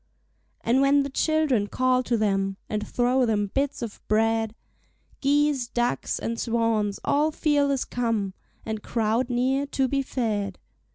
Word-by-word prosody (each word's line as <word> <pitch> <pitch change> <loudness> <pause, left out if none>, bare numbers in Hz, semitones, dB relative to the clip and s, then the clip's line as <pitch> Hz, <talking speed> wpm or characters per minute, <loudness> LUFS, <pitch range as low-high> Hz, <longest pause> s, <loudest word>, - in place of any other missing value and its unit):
And 250 +3 +2
when 280 +1 +4
the 280 - -5
children 295 -8 +1
call 255 +2 +2
to 245 -2 0
them 195 -2 0
And 215 0 -3
throw 250 +2 +2
them 205 -3 0
bits 275 -2 -1
of 225 -3 -7
bread, 225 0 +1 0.6
Geese, 285 -2 +2
ducks, 240 0 -1
and 230 0 -3
swans 225 -3 0
all 300 +2 +3
fearless 285 -3 +1
come 225 -5 -1 0.3
And 220 -1 -3
crowd 230 +3 0
near 260 +3 +1
to 270 -1 0
be 275 +2 0
fed. 210 -7 -2
240 Hz, 145 wpm, -25 LUFS, 220-275 Hz, 0.6 s, when